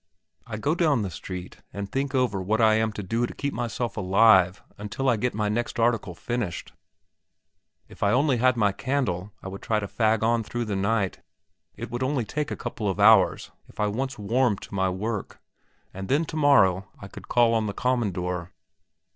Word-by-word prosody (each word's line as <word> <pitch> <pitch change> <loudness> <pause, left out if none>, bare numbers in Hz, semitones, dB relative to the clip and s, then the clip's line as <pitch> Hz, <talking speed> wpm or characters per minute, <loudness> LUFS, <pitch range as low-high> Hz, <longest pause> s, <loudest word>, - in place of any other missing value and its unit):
I 110 - -5
go 145 +8 0
down 155 -9 +2
the 95 - -4
street 90 +2 -7
and 100 0 -5
think 135 +1 -2
over 125 -7 +1
what 105 +5 0
I 110 -1 +5
am 110 0 +1
to 105 - -5
do 115 +6 -1
to - - -10
keep 140 0 -3
myself 120 -1 -3
alive 95 -2 +4 0.2
until 105 +6 -3
I 120 - +4
get 120 +2 -2
my 105 -1 0
next 120 +2 -2
article 115 -6 +1
finished. 120 -6 -4 1.1
If - - -16
I 100 - +3
only 135 +2 +3
had 130 +1 +3
a 105 -3 +2
candle 105 -7 -2
I - - -6
would 95 +1 -7
try 110 -1 0
to 100 - -4
fag 110 0 +1
on 115 +1 +2
through 120 +2 -4
the 105 -2 -3
night; 100 0 0 0.6
it 120 +3 -7
would 120 +1 -4
only 130 -2 0
take 150 +5 -3
a - - -3
couple 105 -4 -3
of 95 - -3
hours 105 -2 +5 0.2
if - - -19
I 105 - +2
once 130 +5 -3
warmed 110 +1 0
to - - -11
my 95 -1 +1
work, 105 +3 -4 0.5
and 95 +1 -6
then 145 +5 +2
tomorrow 135 - +3
I 100 - -9
could - - -12
call 120 -1 +3
on 110 -1 +1
the 100 - -3
"commandor." 90 -8 -1
110 Hz, 195 wpm, -25 LUFS, 100-120 Hz, 1.1 s, I